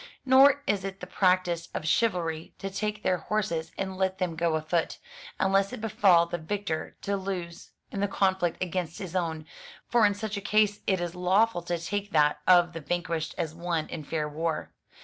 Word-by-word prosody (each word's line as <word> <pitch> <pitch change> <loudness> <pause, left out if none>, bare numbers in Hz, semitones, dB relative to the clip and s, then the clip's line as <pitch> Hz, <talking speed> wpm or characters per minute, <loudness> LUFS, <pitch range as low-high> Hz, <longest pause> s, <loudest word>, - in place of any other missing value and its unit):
Nor 270 +2 +6
is 200 -2 0
it 195 0 -5
the - - -6
practice 180 -2 +1
of 155 - -3
chivalry 165 -5 0
to 195 - -5
take 210 +1 -3
their 180 -1 +1
horses 190 -5 -2
and 190 -1 -3
let 190 0 0
them 180 -3 -2
go 165 0 +1
afoot; 155 +2 -1 0.4
unless 195 +1 +2
it - - -6
befall 205 -6 +4
the 175 0 -4
victor 165 -1 -3
to 200 - 0
lose 185 -3 -5 0.2
in 200 - -4
the 200 - +1
conflict 190 -3 0
against 175 -2 -3
his 185 -2 -7
own; 160 -3 -2 0.4
for 235 -2 +3
in 205 - -1
such 210 0 -4
a - - -4
case 210 0 +2
it 190 -2 +2
is 175 -1 -3
lawful 185 +3 +2
to 175 0 -2
take 205 +4 -3
that 150 -1 +3
of 175 -1 +6
the 165 - -6
vanquished 165 0 -2
as 165 -3 -2
won 170 -2 -2
in 160 - -6
fair 155 +1 -2
war. 160 +2 -3
180 Hz, 190 wpm, -28 LUFS, 165-200 Hz, 0.4 s, Nor